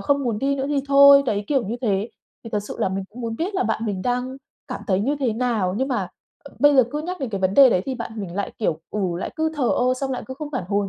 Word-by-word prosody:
không 280 -1 +1
muốn 230 -3 -1
đi 275 +4 0
nữa 270 - -2
thì 285 -2 +1
thôi, 280 0 +8
đấy, 210 -3 -1
kiểu 270 -6 +1
như 225 +4 -3
thế. 205 -2 0 0.4
Thì 230 - -8
thật 210 -2 0
sự - - -6
là - - +2
mình 190 +1 -3
cũng 245 +4 -11
muốn 230 -1 -4
biết 370 +5 -3
là 380 - +1
bạn - - -1
mình 190 -3 -3
đang 250 +1 -2 0.3
cảm - - -5
thấy 190 -1 +1
như 275 +8 0
thế 245 -4 +1
nào? 220 -6 0
Nhưng 265 +4 -1
mà, 205 -9 -1 0.4
ờ, 280 - -13
bây 290 +2 +5
giờ 260 - +8
cứ 295 - -3
nhắc 360 0 -5
đến 265 - -2
cái 195 -2 -3
vấn 185 +1 +1
đề 275 +1 +8
đấy 180 - +2
thì 265 - -2
bạn 230 -2 -6
mình 180 -3 -6
lại, 200 - -3
kiểu, 165 -8 -1
ừ, 210 - -3 0.2
lại - - -4
cứ 315 0 0
thờ 270 -5 0
ơ, 255 +1 +2
xong 270 +1 -3
lại 255 - -3
cứ 260 - -6
không 295 +1 -6
phản 225 -9 -2
hồi 200 -1 0
245 Hz, 305 wpm, -22 LUFS, 205-275 Hz, 0.4 s, thôi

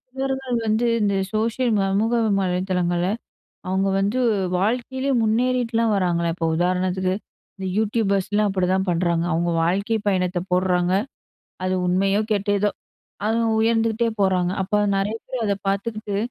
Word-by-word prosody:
இவர்கள் 265 -2 -2
வந்து 220 +3 +2 0.2
இந்த 200 -1 +1 0.2
சோஷியல் 230 +3 0
சமூக 200 +4 +1 0.3
வலைதளங்கள்ல 180 -1 0 0.6
அவுங்க 190 +1 +1
வந்து 205 +6 0 0.4
வாழ்க்கையிலேயே 255 +5 -1
முன்னேறிட்லாம் 230 0 +1
வராங்களே! 170 -3 +1
இப்ப 165 -2 -2
உதாரணத்துக்கு 185 +1 0 0.4
இந்த 190 -1 -5
யூடியூபர்ஸ்லாம் 210 -1 +1
அப்பிடிதான் 190 0 0
பண்ணுறாங்க. 170 -1 +1
அவுங்க 170 +2 0
வாழ்க்கை 200 +6 0
பயணத்த 180 -2 0
போட்றாங்க. 180 0 +2 0.7
அது 185 0 0
உண்மையோ! 195 +3 +2
கெட்டதோ! 205 0 +1 0.6
அவுங்க 230 +1 +1
உயர்ந்துகிட்டே 225 0 +2
போறாங்க. 185 -2 +2
அப்ப 210 +2 +1 0.2
நிறைய 205 +3 -1
பேர் 250 -3 -3
அத 200 -1 +1
பார்த்துக்கிட்டு, 205 0 -2
200 Hz, 120 wpm, -22 LUFS, 185-225 Hz, 0.7 s, வந்து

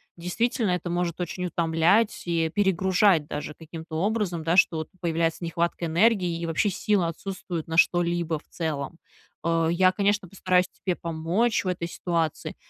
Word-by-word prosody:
Действительно, 215 +6 -1
это 180 0 -2
может 175 0 -2
очень 180 +1 -3
утомлять 170 +6 +2
и 165 -2 0
перегружать 190 -4 +3
даже 150 +1 -5
каким-то 160 0 -9
образом, 200 -6 -1
да, 165 +2 +2
что 170 -3 +4
вот 160 - -5
появляется 165 0 0
нехватка 170 0 -1
энергии, 180 -1 +2
и 170 - -3
вообще 165 +5 +1
силы 195 -2 +1
отсутствуют 175 -1 -5
на 165 - -4
что-либо 170 -2 +2
в - - -27
целом. 160 -1 -4 0.5
Э, 165 -1 +2
я, 185 +1 +4
конечно, 200 0 0
постараюсь 185 -1 +1
тебе 180 -2 -3
помочь 170 +8 0
в - - -2
этой 175 -2 -2
ситуации, 165 -4 -2
175 Hz, 155 wpm, -26 LUFS, 165-185 Hz, 0.5 s, что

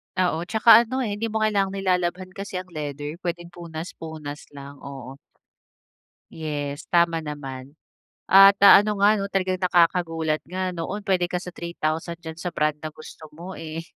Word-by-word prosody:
Oo, 175 -2 0
'tsaka 220 +3 +7
ano, 260 +2 -2
eh, 215 - -2
hindi 230 - -1
mo 220 0 -1
kailangang 200 -2 +1
nilalabhan 185 -1 -1
kasi 195 0 -8
ang 185 0 -5
leather, 150 +1 -6
puwedeng 175 -1 -5
punas-punas 160 -3 -8
lang, 140 0 -10
oo. 135 -1 -9 1.2
Yes, 145 -3 -5
tama 170 -2 +3
naman. 140 -2 -8 0.5
At, 195 +1 +8
ah, 200 - +10
ano 210 -1 -2
nga 210 +1 +5
'no 195 - -2
talagang 190 -2 -1
nakakagulat 165 -3 +2
nga 185 +2 -2
noon 180 +4 -5
puwede 190 -3 +1
ka 180 0 -3
sa 180 - -7
3,000 170 -1 -3
diyan 160 -1 -8
sa 175 -1 -4
brand 150 -1 0
na 155 0 -7
gusto 155 +1 -12
mo, 180 +4 -8
eh. 160 0 -6
170 Hz, 165 wpm, -24 LUFS, 155-190 Hz, 1.2 s, ah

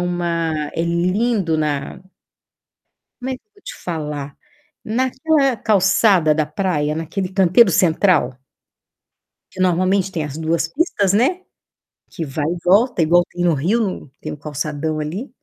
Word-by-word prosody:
uma 170 -3 -2
é 165 - -1
lindo 180 +2 0
na 145 -1 -2 1.2
Como 260 - -3
é - - -1
que - - -27
eu 425 - -55
vou 405 - -24
te - - -8
falar? 150 -4 -5 0.5
Naquela 260 +3 +1
calçada 195 -5 +3
da 155 0 0
praia, 150 -2 -1
naquele 175 +4 -3
canteiro 190 +2 +5
central 165 -5 +2 1.1
que 185 - -8
normalmente 185 +1 +1
tem 160 -3 -2
as 145 -1 -6
2 160 +1 -1
pistas, 205 - 0
né, 260 - +2 0.7
que 165 - -5
vai 145 +1 -3
e 170 +3 -1
volta, 205 +3 +3
igual 175 +2 +4
tem 175 - -4
no 175 -2 +3
Rio, 180 - +1
no 185 -9 -4
tem 155 - -5
o 150 - -7
calçadão 150 +1 -3
ali. 170 - -5
175 Hz, 150 wpm, -19 LUFS, 155-200 Hz, 1.2 s, canteiro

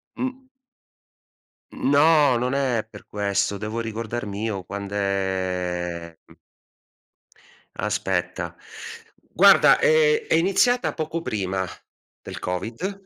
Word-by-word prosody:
Mh. 260 0 -5 1.2
No, 145 -2 +4
non 125 +2 -1
è 130 -5 0
per 105 -2 -13
questo. 100 0 -1
Devo 110 +3 -4
ricordarmi 110 -2 -5
io 100 -5 -3
quand'è 95 -4 -3
mh - - -23 1.4
Aspetta. - - -2 0.7
Guarda, 195 +3 +5
ehm, 465 -1 +3
è - - +1
iniziata 195 +8 +2
poco 160 +1 -3
prima 95 - -2 0.6
del - - -8
Covid, 120 - -4
110 Hz, 90 wpm, -23 LUFS, 100-165 Hz, 1.4 s, Guarda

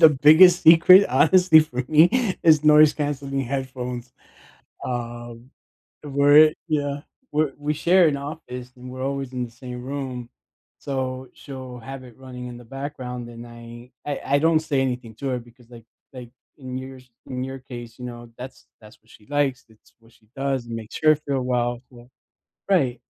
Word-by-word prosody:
the 160 - +11
biggest 155 +6 +6
secret 170 +4 +7
honestly 160 +4 +5
for 130 -5 -3
me 185 +7 +3
is 155 -2 +4
noise-cancelling 145 -2 +3
headphones, 125 -2 -5 0.7
um, 120 0 -6 0.5
where 145 0 +3
it 155 0 +7
Yeah, 145 -2 -2 0.3
we're 150 -2 0
we 150 +1 -2
share 175 +2 +4
an 140 - -1
office, 125 -4 -8
and 125 0 -11
we're 130 0 -7
always 135 -1 -4
in 125 -1 -3
the 120 - -10
same 125 0 -9
room, 130 -3 -6 0.5
so 130 -2 -4
she'll 130 -3 -10
have 135 +2 -9
it 120 -2 -15
running 125 -1 -9
in 120 -1 -8
the 120 - -14
background, 125 -2 -7
and 120 0 -11
I 120 +1 -12
I 145 -2 -4 0.2
I - - +3
don't 160 0 +3
say 140 -3 -1
anything 125 -3 -3
to 135 - -5
her, 125 -1 -1
because, 120 0 -18
like 115 -2 -13 0.3
like, 125 -2 -10 0.3
in 130 -1 -7
your 130 0 -9
s 125 0 -20 0.2
in 130 0 -4
you 135 0 -7
case, 120 -2 -9
you 125 - -7
know, 120 -1 -10
that's 130 +1 -10
that's 110 0 -17
what 110 - -28
she 105 - -19
likes, 140 -3 0
it's 110 -1 -25
what 115 0 -23
she 110 - -28
does 135 -3 -2
and 115 - -7
makes 110 -1 -8
her 155 0 +6
feel 140 -3 -3
well, 120 -1 -1
so 120 0 -16 0.6
Right. 130 -10 +1
130 Hz, 180 wpm, -23 LUFS, 120-145 Hz, 0.7 s, the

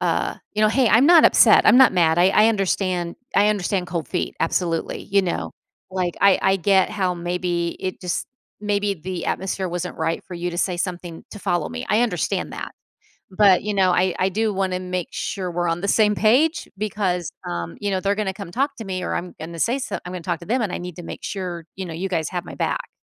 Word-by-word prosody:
uh, - - 0 0.2
you 215 +1 0
know, 215 - +5
"Hey, 250 +2 +3
I'm 235 +7 +5
not 340 -2 +7
upset, - - +7
I'm - - +7
not 260 -5 +7
mad, 165 -2 +3
I 180 +2 +6
I 215 +3 +5
understand 185 -4 -1 0.2
I 205 +1 +5
understand 195 -3 0
cold 170 -3 -4
feet, 180 - -2
absolutely." 165 0 -1
You 200 0 +2
know, 180 - -3 0.4
like, 180 -2 -2
"I 200 -1 +5
I 190 0 +3
get 190 +1 +3
how 185 -4 -1
maybe 175 0 -2
it 185 - -4
just 180 -3 -3 0.3
maybe 205 -1 0
the 180 0 -5
atmosphere 190 -1 -2
wasn't 175 +1 -4
right 165 - -1
for 180 - -9
you 175 +1 -3
to 175 - -5
say 180 -2 0
something 175 -2 -5
to 210 - -8
follow 175 -5 -1
me, 80 0 -6
I 215 - +3
understand 180 -9 -1
that. - - -6 0.6
But, 190 -2 +5
you 210 0 -2
know, 190 -2 +3
I 180 0 +2
I 185 - +3
do 215 +2 0
wanna 185 -1 -1
make 180 -1 -3
sure 185 -3 -4
we're 175 0 -1
on 165 +1 -1
the 200 - -2
same 210 -2 +4
page 295 - +2
because, 195 -5 -2 0.2
um, 85 -1 -5
you 205 - -1
know, 190 - 0
they're 200 0 +1
gonna 200 -3 -2
come 195 -3 -9
talk 275 +5 -1
to 225 - -6
me 185 -1 -3
or - - -2
I'm 180 0 -4
gonna 165 +1 -7
say 245 - +1
so - - -4
I'm 180 - -6
gonna 180 -2 -6
talk 175 -2 -2
to 170 - -9
them 245 +3 +1
and 200 -4 -1
I - - -1
need 180 -2 -7
to 175 - -8
make - - -8
sure, 180 -4 -5
you 190 - -4
know, 165 - -6
you 185 +4 -3
guys 160 -5 -1
have 180 -1 -3
my - - -9
back." - - -2
185 Hz, 235 wpm, -22 LUFS, 175-205 Hz, 0.6 s, not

